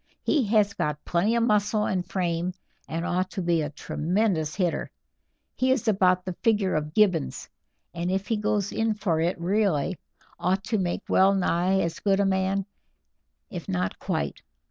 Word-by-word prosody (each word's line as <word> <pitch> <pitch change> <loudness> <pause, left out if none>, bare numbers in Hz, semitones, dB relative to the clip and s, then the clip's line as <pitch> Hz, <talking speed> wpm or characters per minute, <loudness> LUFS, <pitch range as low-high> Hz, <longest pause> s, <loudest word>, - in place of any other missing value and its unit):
"He 290 -6 +2
has 205 -1 +3
got 150 -1 -3
plenty 195 +7 +1
of 235 - +2
muscle 210 -1 +2
and 185 -1 0
frame, 175 -1 -2 0.3
and 165 +2 -3
ought 185 +1 0
to 190 - -4
be 170 -1 +2
a 150 - -2
tremendous 160 +1 -1
hitter; 180 -4 -1 0.7
he 255 - +1
is 260 -3 +1
about 185 -3 +3
the 185 - -3
figure 210 -4 +2
of 150 0 -2
Gibbons, 190 - +2 0.5
and 170 +1 -2
if 190 +1 -1
he 225 - 0
goes 210 -1 0
in 225 -1 0
for 180 -6 0
it 170 +2 0
really, 185 -3 0 0.4
ought 190 +2 0
to 215 0 -1
make 175 -2 -2
well 195 +1 +4
nigh 185 +1 +2
as 170 -1 -2
good 195 -1 +2
a 200 - +3
man, 190 0 +1 0.9
if 175 -5 -7
not 90 0 -2
quite. - - -3
190 Hz, 170 wpm, -26 LUFS, 170-210 Hz, 0.9 s, well